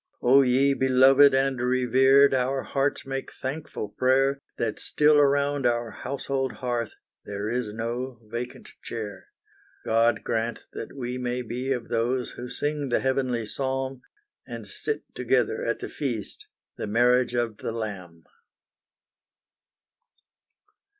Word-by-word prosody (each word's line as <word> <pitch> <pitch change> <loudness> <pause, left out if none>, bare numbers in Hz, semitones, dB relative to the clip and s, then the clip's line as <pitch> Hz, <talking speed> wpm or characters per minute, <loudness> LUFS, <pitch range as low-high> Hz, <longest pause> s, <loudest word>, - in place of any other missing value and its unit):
Oh 130 +3 +6
ye 135 +2 +3
beloved 130 +1 +6
and 135 -2 +1
revered! 130 +2 +4
Our 130 +1 0
hearts 140 +1 -1
make 135 0 -4
thankful 135 -6 -5
prayer, 135 +4 +2 0.2
That 110 -2 -2
still 150 0 +3
around 140 -1 +2
our 120 -1 0
household 135 +1 -3
hearth 120 -3 -3 0.3
There 100 +1 -4
is 120 -3 -2
no 120 +3 -4
vacant 120 +3 -6
chair. 105 -4 -6 0.6
God 115 +1 +2
grant 115 0 -2
that 115 - -7
we 125 -1 -4
may 125 0 -2
be 125 +3 -3
of 120 -4 -2
those 120 +2 0
Who 125 +1 -8
sing 145 +2 -2
the 120 - +2
heavenly 130 -3 0
psalm, 135 +2 -3 0.5
And - - -7
sit 440 - -4
together 450 +2 +1
at - - 0
the - - -6
feast, 420 - -4 0.3
The - - -4
marriage 125 +3 +3
of 120 -3 -1
the - - -4
Lamb! 95 -7 -6
125 Hz, 130 wpm, -26 LUFS, 120-135 Hz, 0.6 s, Oh